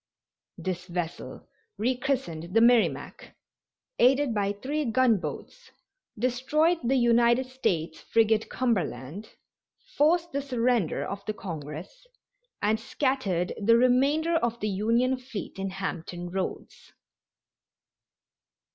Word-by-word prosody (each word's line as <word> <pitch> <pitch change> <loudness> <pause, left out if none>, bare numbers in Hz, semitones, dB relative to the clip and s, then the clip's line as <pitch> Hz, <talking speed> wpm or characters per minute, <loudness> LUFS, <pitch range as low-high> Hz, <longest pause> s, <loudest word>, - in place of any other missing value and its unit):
This 180 -1 -4
vessel, 175 -2 -5 0.3
rechristened 240 - -2
the - - +7
Merrimac, 235 0 +2 0.6
aided 265 0 +4
by 200 -2 0
three 275 +9 -3
gun 240 -3 +3
boats, - - -8 0.5
destroyed 260 +8 +1
the 250 +3 +2
United 240 0 +4
States 175 -11 -2
frigate 220 -1 +2
Cumberland, 190 - -2 0.7
forced 335 +3 +3
the 280 - -1
surrender 245 - 0
of 200 0 -6
the 215 - -2
Congress 165 - -8 0.6
and 215 +1 +2
scattered 230 - -1
the 230 +3 +5
remainder 280 +7 +3
of 235 -5 -1
the 210 - -1
Union 230 +6 +1
fleet 235 -6 -7
in 195 0 -2
Hampton 175 -2 -5
Roads. 190 0 -5
230 Hz, 105 wpm, -27 LUFS, 190-260 Hz, 0.7 s, the